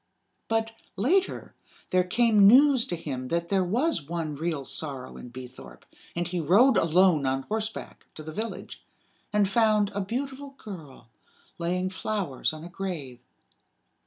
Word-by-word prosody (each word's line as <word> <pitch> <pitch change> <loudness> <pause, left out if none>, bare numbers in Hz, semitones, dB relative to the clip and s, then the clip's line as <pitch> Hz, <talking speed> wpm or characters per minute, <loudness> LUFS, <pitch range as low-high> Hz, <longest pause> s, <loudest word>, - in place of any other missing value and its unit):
But, 225 0 0 0.2
later, 340 - 0 0.4
there 185 0 +4
came 210 +1 +4
news 265 +2 +6
to 175 - -2
him 135 -6 -5
that 170 +3 -2
there 195 -2 +2
was 240 - +1
one 165 -3 -3
real 155 -1 -3
sorrow 135 -4 -2
in 125 - -9
Beethorpe; 125 - -11 0.3
and 175 0 -1
he 175 0 -3
rode 205 - +5
alone 165 -4 +3
on 135 0 -1
horseback 220 +4 -5
to 155 - -8
the 155 - -7
village, 225 +6 -6 0.5
and 210 -1 +3
found 215 -1 +2
a 205 - -2
beautiful 270 +6 -5
girl 150 - -11 0.5
laying 180 +2 -1
flowers 190 -8 -2
on 155 0 -9
a - - -7
grave. 170 -10 -6
185 Hz, 145 wpm, -27 LUFS, 155-220 Hz, 0.5 s, news